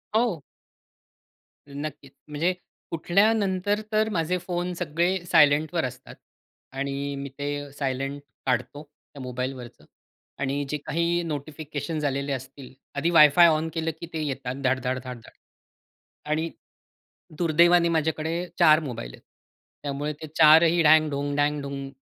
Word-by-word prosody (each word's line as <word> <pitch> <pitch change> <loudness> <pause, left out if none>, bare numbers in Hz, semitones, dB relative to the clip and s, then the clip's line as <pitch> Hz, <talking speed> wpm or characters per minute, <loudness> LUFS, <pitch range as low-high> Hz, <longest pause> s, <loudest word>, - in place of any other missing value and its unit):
हो. 220 -9 +1 1.3
नक्कीच, 145 -2 -7 0.2
म्हणजे 160 +5 0 0.4
उठल्यानंतर 200 +3 +2
तर 215 0 +2
माझे 180 -1 0
फोन 180 0 -2
सगळे 175 +2 0
सायलेंटवर 150 +3 +4
असतात 130 +1 -8 0.6
आणि 140 +1 -3
मी 140 0 -6
ते 145 0 -4
सायलेंट 135 0 -3 0.3
काढतो, 135 +3 -1 0.3
त्या 140 - -9
मोबाईलवरचं 125 -1 -6 0.5
आणि 140 +1 -1
जे 150 - -1
काही 170 +2 0
नोटिफिकेशन्स 155 0 -5
आलेले 140 0 -1
असतील 130 0 -7 0.2
आधी 150 +4 0
वाय-फाय 165 +1 +7
ऑन 160 0 +1
केलं 165 -1 -1
की - - -6
ते 160 - -2
येतात 135 -3 -4
धाड-धाड, 130 0 0
धाड-धाड. 125 -3 -9 0.9
आणि 155 +2 -1 0.9
दुर्दैवाने 170 +1 +4
माझ्याकडे 160 +2 -1
4 155 -2 +7
मोबाईल 120 - -6
आहेत. - - -15 0.6
त्यामुळे 145 +1 -3
ते 155 - -6
चारही 165 +2 +6
ढँग-ढुंग, 150 -2 +3
ढँग-ढुंग 140 -2 -1
150 Hz, 115 wpm, -25 LUFS, 140-170 Hz, 1.3 s, वाय-फाय